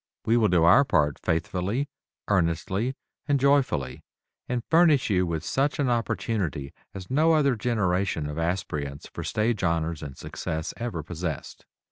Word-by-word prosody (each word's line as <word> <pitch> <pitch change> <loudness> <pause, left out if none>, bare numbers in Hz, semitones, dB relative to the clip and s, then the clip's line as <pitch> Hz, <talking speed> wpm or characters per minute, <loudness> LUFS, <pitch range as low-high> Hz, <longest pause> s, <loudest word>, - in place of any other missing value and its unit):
We 115 - +3
will 115 -3 +4
do 90 -3 +3
our 90 +12 +7
part 75 - +1
faithfully, 95 - -1 0.4
earnestly 95 +6 0 0.3
and 145 -2 +2
joyfully, 130 - +1 0.5
and 125 -1 -1
furnish 160 -8 +4
you 90 -4 +1
such 135 - 0
an 135 -4 +1
opportunity 100 - -2 0.2
as 95 +2 -8
no 160 +4 +4
other 140 -5 +3
generation 100 -7 0
of 75 +2 -5
aspirants 75 -5 -3
for - - -5
stage 110 -1 0
honors 85 -2 0
and 70 -3 -8
success 80 0 -4
ever 105 -8 -4
possessed. 80 -2 -6
95 Hz, 140 wpm, -26 LUFS, 80-125 Hz, 0.5 s, our